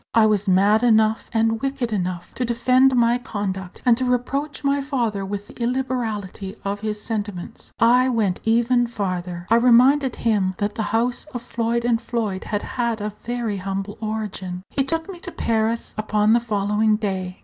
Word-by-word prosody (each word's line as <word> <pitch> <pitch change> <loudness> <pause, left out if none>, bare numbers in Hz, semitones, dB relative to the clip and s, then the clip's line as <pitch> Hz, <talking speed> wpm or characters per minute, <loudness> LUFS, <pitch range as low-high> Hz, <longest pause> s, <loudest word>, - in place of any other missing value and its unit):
I 225 -1 +6
was 210 -1 +1
mad 200 +4 +4
enough 220 -2 +3
and 225 -1 +1
wicked 270 -4 -2
enough 180 -3 -3
to 255 - -2
defend 255 +2 +3
my 240 0 +3
conduct, 190 -5 -5
and 245 -2 +6
to 260 - -1
reproach 270 +4 -1
my 280 0 +2
father 240 -8 -1
with 200 +1 -4
the - - -13
illiberality 235 -6 -2
of 200 +1 -2
his 210 0 -3
sentiments. 210 -3 -5
I 250 +3 +5
went 215 -7 0
even 240 +2 +3
farther: 180 -5 -4
I 230 - +7
reminded 250 +3 +5
him 200 -5 +1
that 205 0 -1
the 220 - -3
house 240 +2 0
of 240 - -4
Floyd 235 0 -1
and 235 -1 +2
Floyd 215 -6 -3
had 205 -1 -2
had 235 -2 -2
a 210 0 -4
very 235 -3 -2
humble 195 +1 -4
origin. 205 -4 -4
He 275 - +1
took 325 +4 -2
me 380 -3 -8
to 355 - -7
Paris 225 -2 -1
upon 215 0 +2
the 235 - +5
following 215 -1 +1
day. 190 -4 -3
225 Hz, 175 wpm, -22 LUFS, 205-245 Hz, -, I